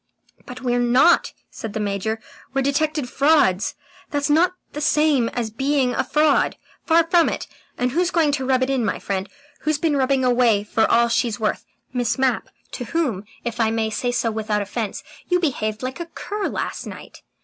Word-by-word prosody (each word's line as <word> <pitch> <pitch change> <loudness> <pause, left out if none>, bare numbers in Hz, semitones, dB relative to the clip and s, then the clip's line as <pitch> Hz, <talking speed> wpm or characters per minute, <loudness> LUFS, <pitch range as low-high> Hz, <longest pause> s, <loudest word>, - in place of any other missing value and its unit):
"But 250 0 -8
we're 245 -1 +1
not," 245 +8 +4 0.2
said 220 -2 -7
the 220 - -3
Major. 210 +2 -2 0.4
"We're 270 - +2
detected 285 0 0
frauds! 265 - +3 0.3
That's 290 0 0
not 355 +4 +3 0.2
the 295 - -4
same 295 -5 +3
as 230 -3 -3
being 265 +2 +1
a - - 0
fraud; 300 0 +2 0.3
far 330 0 +4
from 340 -1 +4
it. - - -4 0.3
And 250 0 0
who's 350 +5 +1
going 330 -5 +2
to 285 -2 -1
rub 260 -1 +3
it 260 - -1
in, 260 -3 +1
my 220 - 0
friend? 195 0 -3 0.3
Who's 310 -1 0
been 305 -1 +1
rubbing 265 -1 +2
away 240 -4 +3
for 220 +1 +1
all 235 0 +4
she's 230 -2 0
worth? 215 - -1 0.3
Miss 245 -3 0
Mapp, 260 -3 0 0.2
to 245 - -5
whom, 245 - -1 0.2
if 235 0 -4
I 225 -1 +3
may 220 -1 -1
say 245 +2 -1
so 240 -2 0
without 215 -1 -1
offence, 210 +1 -4 0.3
you 360 0 +3
behaved 220 -9 -2
like 260 +3 -4
a 340 - -5
cur 405 +4 -4
last - - -4
night." - - -10
255 Hz, 190 wpm, -22 LUFS, 225-295 Hz, 0.4 s, not